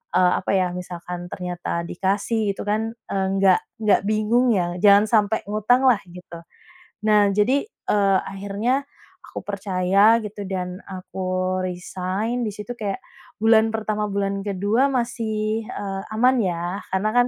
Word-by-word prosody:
eee, 180 -1 +5
apa - - -3
ya, 185 -1 +2
misalkan 180 0 -6
ternyata 175 -1 -4
dikasih 205 +4 0
gitu - - -6
kan, 220 +2 0 0.2
eee, 190 -1 0
nggak 190 -2 +5 0.2
nggak 210 - +4
bingung 220 +4 +2
ya, 175 -2 -1
jangan 205 0 +7
sampe 215 -1 +3
ngutang 215 +5 +2
lah, 240 -5 +5
gitu. 175 -1 -11 0.7
Nah, 210 -1 +5
jadi, 250 +7 +3
eee, 200 - +1
akhirnya 205 +8 -2 0.4
aku - - -7
percaya, 200 +2 +3
gitu, 205 -1 -6
dan 180 -1 -4
aku 185 0 -3
resign, 185 +6 -3
di - - -3
situ 210 +4 -6
kayak 200 -3 -3 0.4
bulan 225 0 +5
pertama, 215 -1 -1
bulan 200 0 -1
ke-2, 205 +6 +1
masih, 225 -3 -1
eee, 195 -1 -4
aman 250 +4 +4
ya, 175 0 -2
karena 190 +3 +1
kan 245 0 +5
200 Hz, 140 wpm, -23 LUFS, 185-220 Hz, 0.7 s, jangan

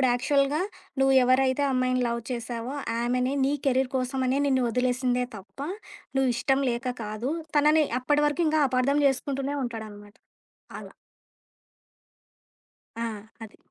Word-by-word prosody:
అప్పుడు 260 - +4
యాక్చువల్‌గా 280 +5 +1 0.4
నువ్వు 270 0 +4
ఎవరైతే 260 +2 +3
అమ్మాయిని 255 0 +1
లవ్ 235 0 -2
చేశావో 240 +2 -4 0.3
ఆమెనే 250 +3 0
నీ 275 - +1
కెరీర్ 260 0 +2
కోసమనే 260 +1 0
నిన్ను 260 -2 +2
వదిలేసిందే 250 +1 0
తప్పా 275 - -8 0.5
నువ్విఇష్టం 265 +1 +2
లేక 240 +2 -4 0.2
కాదు. 215 +5 -3 0.3
తనని 300 +1 +5 0.2
అప్పటి 290 +4 +2
వరకు 295 +4 -1
ఇంకా 310 0 +2
అపార్థం 260 +3 +2
చేసుకుంటూనే 275 +1 -1
ఉంటాడనమాట. 215 -3 -8 0.7
అలా! - - -12 2.0
ఆ! 230 - -3 0.4
అది. 220 -1 -10
255 Hz, 120 wpm, -26 LUFS, 245-275 Hz, 2.0 s, తనని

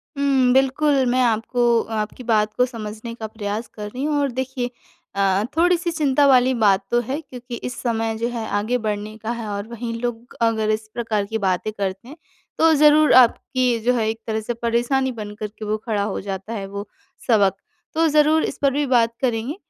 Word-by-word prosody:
हुँ, 270 -3 +3
बिल्कुल। 270 +1 +3
मैं 250 +1 +2
आपको 235 +1 +2
आपकी 215 +3 -4
बात 215 -2 +1
को 250 - +4
समझने 225 -1 -7
का 220 -2 -6
प्रयास 215 +1 -4
कर 210 -1 -6
रही 255 +5 -5
हूँ 300 0 0
और 280 -2 0
देखिए 260 0 -3 0.5
अ - - -3
अ, 195 +1 +2
थोड़ी-सी 345 0 +2
चिंता 290 -3 +2
वाली 260 -1 +5
बात 205 -5 +3
तो 240 - +3
है 260 +5 -3
क्योंकि 250 -4 -9
इस 245 +1 -6
समय 225 -2 -1
जो 230 +1 -1
है 235 -2 -4
आगे 220 +5 0
बढ़ने 215 -1 -4
का 220 +1 -4
है 230 -2 -5
और 200 +1 -4
वहीं 235 0 -5
लोग 240 0 -5
अगर 220 -2 +1
इस 215 0 -1
प्रकार 220 -4 -1
की 220 +2 -3
बातें 190 +1 -1
करते 195 +1 -4
हैं 290 +5 -11 0.4
तो 325 0 +5
ज़रूर 300 0 +5
आपकी 250 0 +4
जो 250 - +4
है 225 -3 0
एक 225 0 -4
तरह 220 -1 -1
से 230 +3 -3
परेशानी 240 +3 0
बन 210 -3 -7
कर 215 0 -4
के 215 - -6
वो 210 +1 -1
खड़ा 210 -4 0
हो 205 -1 -3
जाता 195 +2 -5
है 200 -3 -4
वो 200 +1 -6 0.4
सबक। 200 -5 +4 0.4
तो 325 +1 +3
ज़रूर 305 +1 +4
इस - - -5
पर 280 -1 +3
भी 290 +1 0
बात 235 -3 +2
करेंगे। 245 +2 -1
235 Hz, 205 wpm, -22 LUFS, 215-260 Hz, 0.5 s, वाली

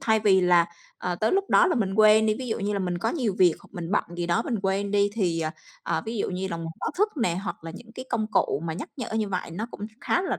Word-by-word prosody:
thay 220 -1 +2
vì 195 -3 +5
là, 175 -2 +5 0.3
ờ, 180 - -2
tới 215 +5 +1
lúc 395 +1 +1
đó - - +6
là 350 - +2
mình 195 -7 0
quên 215 +1 +6
đi, 215 - +3
ví 255 -1 -5
dụ 220 - -1
như 205 0 -1
là 200 - 0
mình 180 -2 -2
có - - 0
nhiều 245 - -1
việc, 180 -3 +6
hoặc - - -18
mình 175 -3 -5
bận - - +2
gì 175 0 -2
đó 170 0 +2
mình 235 - -2
quên 195 +1 0
đi, 205 0 +3
thì, 175 -6 0 0.4
ờ, - - -1
ví 230 - -3
dụ - - -1
như 190 +1 -3
là 170 - -3
một 165 0 -5
báo - - -1
thức 420 - +4
nè, 230 - +1
hoặc 175 - -5
là 165 - -5
những 225 +3 -12
cái 255 - -7
công 215 - 0
cụ 175 -7 +1
mà 160 - -2
nhắc 175 - -6
nhở 250 -5 -5
như 215 -2 0
vậy 180 -3 -3
nó 210 +7 -4
cũng 205 - -6
khá 355 - +1
là 375 - -2
200 Hz, 300 wpm, -26 LUFS, 180-220 Hz, 0.4 s, đó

